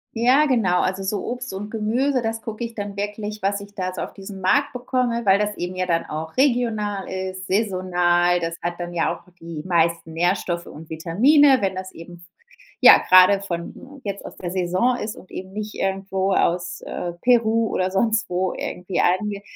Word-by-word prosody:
Ja, 255 +6 +4
genau, 205 -10 +2
also 190 +1 -1
so 195 0 -2
Obst 250 -3 -5
und 205 +2 -5
Gemüse, 235 +4 0
das 225 0 -2
gucke 225 +1 -6
ich 235 0 -5
dann 205 -2 -6
wirklich, 210 +1 -4
was 200 +1 0
ich 205 0 -13
da 185 -2 -3
so - - -5
auf - - -5
diesem 195 0 -9
Markt 185 +6 +2
bekomme, 245 -1 -1
weil 195 0 +5
das 210 0 -1
eben 180 +1 -4
ja 185 0 -1
dann 170 -2 +1
auch 160 +1 -6
regional 225 -7 +1
ist, 185 0 -5
saisonal. 180 -3 +2
Das 165 0 -3
hat 175 0 -3
dann 175 0 -5
ja 170 - 0
auch - - -15 0.2
die 165 -2 -7
meisten 170 -1 +1
Nährstoffe 175 0 0
und 155 +1 -11
Vitamine, 255 - +4
wenn 190 -1 0
das 185 0 -6
eben 175 +1 -11
v 170 - -18 0.6
ja, - - +11
gerade 185 +2 +7
von 200 +9 -7
jetzt 200 -1 -5
aus - - -9
der 175 -1 -6
Saison 185 +7 +1
ist 215 -3 -5
und 185 - -15
eben 190 +1 -8
nicht 215 +1 -5
irgendwo 195 0 -1
aus, 175 0 0
äh, 175 -1 -5
Peru 230 -2 +3
oder 185 0 0
sonst 220 +3 +1
wo 180 +1 -1
irgendwie 180 0 -4
ange 200 +3 +1
195 Hz, 195 wpm, -22 LUFS, 180-220 Hz, 0.6 s, ja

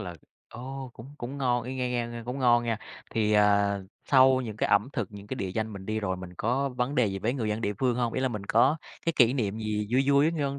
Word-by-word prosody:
là, 90 -4 -6 0.3
ô, 130 +2 -7
cũng 135 +6 -12
cũng 130 +4 -6
ngon 125 -3 +1
y 130 +2 -5
nghe 125 -1 -2
nghe 120 -1 -1
nghe 120 0 -7
cũng 125 +3 -4
ngon 120 -2 +4
nha. 115 -2 -1 0.3
Thì, 105 -1 +1
ờ, 100 -1 +3 0.2
sau 130 -1 +5
những 110 -4 -6
cái - - 0
ẩm 100 +4 +3
thực, 115 -9 -2
những 100 0 -10
cái 130 - -4
địa 95 -6 -3
danh 110 0 -2
mình 95 -1 -9
đi 110 0 -1
rồi 95 -3 -2
mình 90 -1 -8
có 130 +7 0
vấn 125 +2 -2
đề 125 -5 +3
gì 95 -1 -3
với 115 +5 0
người 115 -5 -2
dân 105 +1 -1
địa 105 - -1
phương 125 -2 +1
hông? 120 -2 0
Ý - - -1
là 130 - +1
mình 105 -4 -5
có 135 +7 +4 0.3
cái 165 - +2
kỷ 120 0 +5
niệm 110 -5 -1
gì 105 -1 -2
vui 135 +2 +3
vui 140 +3 +4
người 155 -3 -2
văn 140 0 -2
120 Hz, 280 wpm, -28 LUFS, 105-130 Hz, 0.3 s, sau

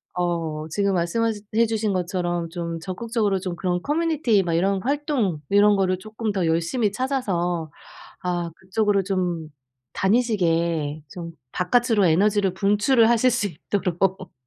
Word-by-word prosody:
어 165 -3 -2
지금 200 +4 0
말씀하신 205 +5 0
해 230 +1 +5
주신 220 -2 -1
것처럼 175 -2 -2
좀 170 -1 -4
적극적으로 200 +2 -1
좀 180 -1 -4
그런 180 0 -1
커뮤니티 295 - +1
막 170 -2 -2
이런 190 +3 +1
활동 270 - 0
이런 205 +1 +5
거를 185 -2 +1
쪼끔 215 +2 -4
더 190 -4 0
열심히 170 +7 +1
찾아서 185 - -1 0.5
아 175 -2 -2
그쪽으로 195 +3 0
좀 180 -4 -2 0.4
다니시게 170 -8 +1
좀 170 -2 -7 0.2
바깥으로 220 +2 +2
에너지를 195 +3 +2
분출을 210 +5 +3
하실 240 +2 +4
수 235 -4 0
있도록. 185 +1 -2
190 Hz, 300 characters per minute, -23 LUFS, 175-220 Hz, 0.5 s, 해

